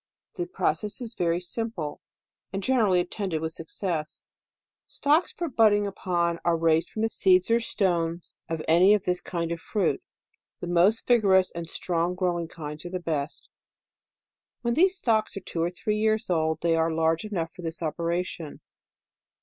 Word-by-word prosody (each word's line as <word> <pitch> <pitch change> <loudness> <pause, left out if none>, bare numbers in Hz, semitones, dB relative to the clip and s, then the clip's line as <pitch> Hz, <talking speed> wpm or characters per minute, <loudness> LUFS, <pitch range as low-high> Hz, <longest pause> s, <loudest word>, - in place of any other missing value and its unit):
The 355 -1 -4
process 210 - -1
is 240 -2 -6
very 170 -3 0
simple, 180 -5 -4 0.5
and 195 +1 -4
generally 215 -8 +3
attended 180 -1 -2
with 160 0 -3
success. 165 -1 -4 0.6
Stocks 305 +4 +2
for 345 - -4
budding 215 -6 +4
upon, 175 -3 -1
are 170 -1 +2
raised 165 0 +2
from 220 - -3
the 225 - +2
seeds 185 +2 +3
or 230 - +5
stones 175 -6 -1 0.2
of 165 -1 -3
any 180 +6 +6
of 205 - -2
this 180 0 0
kind 170 -2 -3
of 170 - -3
fruit. 200 -6 0 0.6
The - - -5
most 175 +6 +3
vigorous 195 -6 +4
and 170 -1 -6
strong 175 +1 -1
growing 175 -2 -1
kinds 150 -2 -8
are 175 - -6
the 185 0 -3
best. 155 -3 -4 1.2
When 235 0 +1
these 375 +7 +4
stocks 220 - +1
are - - -4
two 165 - -4
or 170 - +1
three 210 +4 -2
years 215 -2 +1
old, 160 -2 +1
they 170 -1 +2
are 165 0 +2
large 160 0 +1
enough 175 -6 -3
for 185 - -11
this 165 0 -3
opera 170 +3 -1
tion. 160 -4 -8
180 Hz, 170 wpm, -26 LUFS, 165-210 Hz, 1.2 s, any